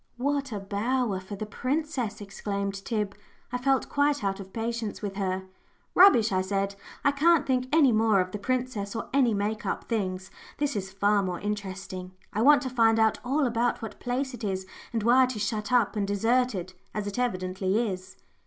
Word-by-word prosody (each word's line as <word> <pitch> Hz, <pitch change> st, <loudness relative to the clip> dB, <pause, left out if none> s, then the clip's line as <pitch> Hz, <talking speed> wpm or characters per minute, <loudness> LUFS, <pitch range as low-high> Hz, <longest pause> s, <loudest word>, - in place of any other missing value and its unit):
"What 280 Hz, +1 st, -1 dB
a 210 Hz, -, -3 dB
bower 210 Hz, +2 st, -1 dB
for 190 Hz, +2 st, -8 dB
the 215 Hz, -, -4 dB
princess!" 255 Hz, -1 st, -2 dB
exclaimed 200 Hz, 0 st, -3 dB
Tib. 210 Hz, -3 st, -1 dB, 0.4 s
I 250 Hz, -, -2 dB
felt 270 Hz, +1 st, +2 dB
quite 285 Hz, -2 st, +1 dB
out 195 Hz, 0 st, -1 dB
of 190 Hz, -1 st, -9 dB
patience 225 Hz, -1 st, -3 dB
with 200 Hz, -1 st, -3 dB
her. 190 Hz, -1 st, -1 dB, 0.5 s
"Rubbish!" 295 Hz, -, +7 dB
I 185 Hz, -1 st, +2 dB
said, 195 Hz, +1 st, -1 dB, 0.3 s
"I 285 Hz, -, +6 dB
can't 300 Hz, +1 st, +4 dB
think 255 Hz, -1 st, +1 dB
any 295 Hz, -4 st, +5 dB
more 220 Hz, -2 st, +4 dB
of 185 Hz, 0 st, 0 dB
the 210 Hz, -, -4 dB
princess 245 Hz, -3 st, -2 dB
or 230 Hz, -, -4 dB
any 250 Hz, -5 st, +4 dB
make 210 Hz, +2 st, -1 dB
up -, -, -2 dB
things. 190 Hz, -4 st, -2 dB, 0.3 s
This 290 Hz, -3 st, -1 dB
is 195 Hz, -1 st, -3 dB
far 200 Hz, +1 st, +2 dB
more 180 Hz, -2 st, -3 dB
interesting. 190 Hz, -3 st, -5 dB, 0.2 s
I 215 Hz, -, 0 dB
want 285 Hz, +3 st, +6 dB
to 260 Hz, -, -2 dB
find 225 Hz, -3 st, +4 dB
out 220 Hz, -1 st, +3 dB
all 275 Hz, +3 st, +1 dB
about 240 Hz, 0 st, 0 dB
what 225 Hz, -, -7 dB
place 260 Hz, +2 st, -2 dB
it 240 Hz, -1 st, -8 dB
is, 190 Hz, -2 st, -2 dB, 0.3 s
and 225 Hz, -3 st, -1 dB
why 250 Hz, +3 st, +6 dB
it 255 Hz, -1 st, -4 dB
is 210 Hz, -, -2 dB
shut 210 Hz, +1 st, -2 dB
up 240 Hz, -3 st, +3 dB
and 205 Hz, -2 st, 0 dB
deserted, 205 Hz, -2 st, +1 dB, 0.2 s
as 210 Hz, -1 st, -2 dB
it 205 Hz, +4 st, -4 dB
evidently 190 Hz, -1 st, 0 dB
is." 190 Hz, -1 st, -6 dB
215 Hz, 195 wpm, -27 LUFS, 195-250 Hz, 0.5 s, Rubbish